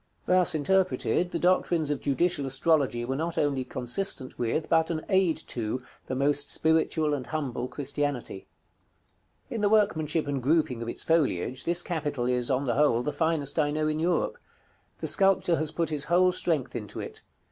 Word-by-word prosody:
Thus 180 -3 +3
interpreted, 180 +2 +1
the 170 - -3
doctrines 170 -3 +1
of 145 - -2
judicial 145 +1 0
astrology 135 -3 +1
were 130 +2 -2
not 165 +4 -3
only 140 -3 +1
consistent 130 +3 -3
with, 120 +6 -1
but 160 -1 +2
an 160 -2 -3
aid 190 -4 +3
to, 120 +2 -3 0.2
the 130 - -3
most 145 +2 +1
spiritual 160 -1 +2
and 135 -3 -3
humble 135 -6 -3
Christianity. 140 -5 -4 1.0
In 225 - -3
the 205 - +3
workmanship 165 -7 +2
and 140 -2 -2
grouping 135 -3 +1
of 115 - -4
its - - -2
foliage, 130 - 0
this 175 +1 +2
capital 145 -7 -2
is, 125 -1 0
on 135 0 +1
the 125 -4 0
whole, 135 -4 +2
the 150 - -2
finest 160 -2 0
I 145 -1 +2
know 155 +1 -1
in 155 0 -1
Europe. 180 - 0 0.6
The - - -4
sculptor 195 -4 +3
has 155 -1 -1
put 165 -1 -1
his 150 -1 -1
whole 180 +2 +4
strength 165 -8 -1
into 105 -4 -6
it. - - -7
150 Hz, 175 wpm, -27 LUFS, 130-170 Hz, 1.0 s, whole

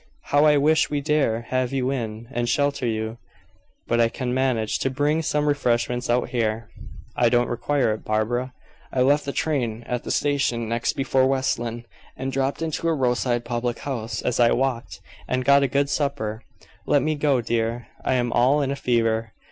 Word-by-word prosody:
"How 145 +1 +5
I 150 -1 +5
wish 155 +3 +3
we 145 - -1
dare 140 -6 +1
have 130 -1 0
you 135 -1 0
in, 115 -3 -4
and 120 -2 -1
shelter 140 -2 +1
you. 110 +1 -3 0.7
But 120 0 +2
I 115 - +4
can 125 0 -3
manage 125 -4 0
to 135 - 0
bring 145 +4 +1
some 150 -1 0
refreshments 125 -3 0
out 120 +1 +1
here." 115 -2 -2 0.4
"I 120 -1 +3
don't 120 0 +2
require 125 -1 +1
it, 110 - -7
Barbara. 120 +4 -1 0.4
I 130 - 0
left 145 +3 +3
the 140 - -2
train 120 -8 -1
at 125 -1 -3
the - - -7
station 135 -5 0
next 115 +1 -1
before 135 -1 +2
West 135 -2 0
Lynne, 120 0 -5 0.3
and 130 +1 -3
dropped 135 +4 -1
into 165 +1 -2
a 165 - +2
roadside 120 -2 0
public 120 0 -2
house 115 -6 -4
as 125 - -1
I 120 -1 +5
walked, 130 -2 -2 0.3
and 130 0 -1
got 140 +1 +6
a 140 - +2
good 140 +2 +1
supper. 140 -7 -2 0.5
Let 145 - +3
me 155 - +1
go, 145 -3 +2
dear, 115 0 -1 0.2
I - - +1
am 120 -1 0
all 130 +4 +4
in 135 - -1
a - - -1
fever." 115 -4 0
125 Hz, 190 wpm, -24 LUFS, 115-140 Hz, 0.7 s, got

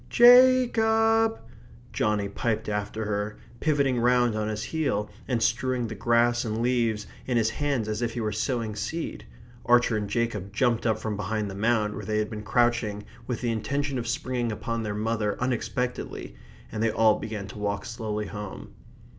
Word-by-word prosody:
Ja 255 +1 +8
cob!" 225 0 +3 0.6
Johnny 105 -1 +1
piped 110 +2 -2
after 105 +1 -2
her, 105 0 -2 0.2
pivoting 140 -5 +2
round 120 -1 +3
on 105 0 -1
his 110 0 -3
heel, 140 -11 -1 0.2
and 120 -4 0
strewing 125 +2 +1
the 110 - -5
grass 120 +3 +2
and 110 -1 -2
leaves 115 -3 +1 0.2
in 125 -2 +1
his 110 -1 +2
hands 140 -5 -1
as 110 +1 -2
if 115 -1 -2
he - - -2
were 110 -2 -1
sowing 110 0 -2
seed. 160 +11 -4 0.4
Archer 120 -1 +4
and 105 -1 -3
Jacob 110 -5 -2
jumped 120 +1 +1
up 110 -1 +2
from 110 -1 -3
behind 105 0 -2
the - - -7
mound 105 +1 +1
where 105 - -6
they 105 +2 -1
had 105 0 -1
been 105 -1 -5
crouching 110 -2 +1 0.2
with 125 - -3
the 120 -2 0
intention 140 +4 -1
of 120 - -4
springing 120 0 -1
upon 115 +2 -3
their 105 -2 -3
mother 105 -1 -1
unexpectedly, 125 0 -3 0.4
and 110 - -3
they 115 - +3
all 110 -1 +3
began 105 -3 -5
to 105 - -9
walk 100 -1 -2
slowly 110 -2 -3
home. 105 -2 -8
115 Hz, 180 wpm, -26 LUFS, 105-125 Hz, 0.6 s, Ja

